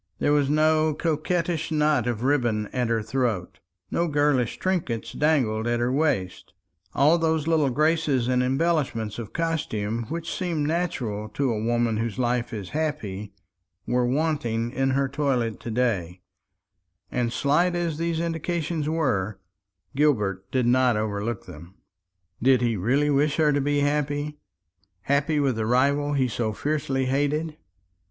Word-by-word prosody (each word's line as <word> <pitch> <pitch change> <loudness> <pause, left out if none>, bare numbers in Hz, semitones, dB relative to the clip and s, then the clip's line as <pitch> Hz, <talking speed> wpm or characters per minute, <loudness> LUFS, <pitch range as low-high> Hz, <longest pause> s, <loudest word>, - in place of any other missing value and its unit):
There 145 - +2
was 145 -2 +2
no 155 0 +3
coquettish 165 +1 -1
knot 150 -5 +2
of 120 -1 -2
ribbon 120 -6 +1
at 125 -2 0
her 115 -2 0
throat; 110 -6 -2 0.3
no 170 - +1
girlish 145 -5 +1
trinkets 165 -12 -2
dangled 125 -8 +1
at 120 0 +1
her 120 +1 +1
waist 130 - -1 0.4
all 155 +5 +4
those 160 -2 +1
little 155 -4 +2
graces 150 -2 +1
and 125 0 +2
embellishments 130 -6 0
of 110 -4 -7
costume 115 -10 -2
which 165 +1 -4
seem 170 -6 -1
natural 130 -11 -2
to 140 -3 +1
a 110 0 -3
woman 120 -1 +1
whose 115 0 -2
life 120 -1 0
is 105 -5 -6
happy, 110 -11 -3 0.5
were 125 0 +1
wanting 125 -5 0
in 135 +1 0
her 140 0 +2
toilet 130 -5 -1
to - - -7
day; 100 -7 -1 0.9
and 120 -2 0
slight 170 +8 +2
as 170 -3 -2
these 165 -1 -1
indications 165 -2 -2
were, 110 -12 0 0.6
Gilbert 105 -10 +1
did 130 -2 +1
not 125 -1 +3
overlook 105 +1 -3
them. 85 +2 -12 0.7
Did 130 0 +4
he 120 -2 +1
really 135 +10 +1
wish 145 +1 +2
her 155 -2 +3
to 145 - +1
be 145 +1 +1
happy 145 +1 -1 0.6
happy 140 - +1
with 135 -5 +1
the 110 -1 -1
rival 140 +4 +2
he 135 -2 +2
so 110 -2 -2
fiercely 140 -1 -1
hated? 145 +4 0
135 Hz, 145 wpm, -25 LUFS, 115-155 Hz, 0.9 s, all